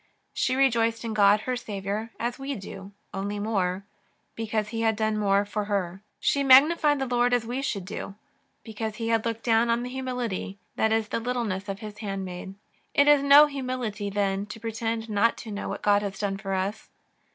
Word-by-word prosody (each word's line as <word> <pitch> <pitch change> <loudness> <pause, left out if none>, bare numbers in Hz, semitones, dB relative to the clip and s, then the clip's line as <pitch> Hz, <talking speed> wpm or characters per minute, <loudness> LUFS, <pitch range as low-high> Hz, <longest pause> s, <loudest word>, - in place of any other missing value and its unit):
She 255 - 0
rejoiced 230 -4 +2
in 225 - -3
God 205 0 +5
her 255 +3 -2
Saviour 210 -1 -4
as 240 +2 -2
we 275 +1 -3
do, 195 -1 -9 0.2
only 200 +2 -3
more, 195 -3 -1 0.5
because 215 -1 -2
He 225 0 -3
had 225 -1 +2
done 215 0 0
more 200 -1 +2
for 205 +1 -3
her. 195 -2 -2 0.2
She 280 - +1
magnified 290 +3 +6
the 270 - -1
Lord 245 0 +2
as 235 -2 -1
we 245 +4 -3
should 200 -9 -3
do, 195 +1 -6 0.5
because 220 0 -5
He 230 +1 -3
had 225 0 +1
looked 230 0 -4
dowTi 230 0 +3
on 235 +1 +1
the 250 - -5
humility, 250 -7 -3 0.2
that 220 - +1
is, 220 -1 +1
the - - -1
littleness 225 -5 -2
of 195 0 -5
His 210 -1 -8
handmaid. 195 -2 -5 0.4
It 285 - +5
is 295 -1 +6
no 280 +2 +8
humility, 255 -7 -3
then, 200 0 -1
to 215 +2 -8
pretend 225 0 -3
not 215 +2 +2
to 220 - -8
know 205 - -4
what - - -5
God 205 0 +4
has 200 -1 -4
done 200 -2 -2
for 195 -1 -3
us. 195 +3 -3
220 Hz, 195 wpm, -26 LUFS, 200-245 Hz, 0.5 s, no